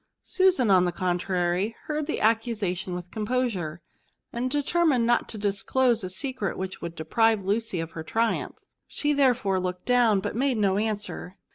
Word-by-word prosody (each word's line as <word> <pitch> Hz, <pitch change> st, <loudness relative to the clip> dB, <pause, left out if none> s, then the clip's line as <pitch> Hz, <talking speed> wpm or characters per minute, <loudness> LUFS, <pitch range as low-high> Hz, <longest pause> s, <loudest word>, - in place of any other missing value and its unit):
Susan, 370 Hz, -, +3 dB
on 185 Hz, -1 st, +5 dB
the 175 Hz, -, 0 dB
contrary, 180 Hz, +3 st, -1 dB
heard 305 Hz, -1 st, -3 dB
the 315 Hz, -, -2 dB
accusation 210 Hz, -5 st, 0 dB
with 180 Hz, 0 st, -7 dB
composure, 210 Hz, -8 st, -2 dB, 0.5 s
and 245 Hz, +2 st, -1 dB
de 290 Hz, +2 st, 0 dB
termined 315 Hz, -7 st, +2 dB
not 240 Hz, +1 st, +2 dB
to 220 Hz, -, -6 dB
disclose 215 Hz, +4 st, +1 dB
a 185 Hz, -, -3 dB
secret 255 Hz, +1 st, -3 dB
which 185 Hz, 0 st, -5 dB
would 170 Hz, 0 st, -6 dB
deprive 220 Hz, +4 st, +1 dB
Lucy 210 Hz, -1 st, -1 dB
of 165 Hz, 0 st, -4 dB
her 165 Hz, -, -6 dB
triumph. 225 Hz, +6 st, -1 dB, 0.3 s
She 295 Hz, 0 st, 0 dB
therefore 250 Hz, -9 st, +2 dB
looked 180 Hz, 0 st, -4 dB
down, 240 Hz, -5 st, +4 dB
but 190 Hz, -, -4 dB
made 260 Hz, 0 st, +1 dB
no 200 Hz, -2 st, +2 dB
answer. 210 Hz, -3 st, -4 dB
215 Hz, 165 wpm, -26 LUFS, 185-245 Hz, 0.5 s, on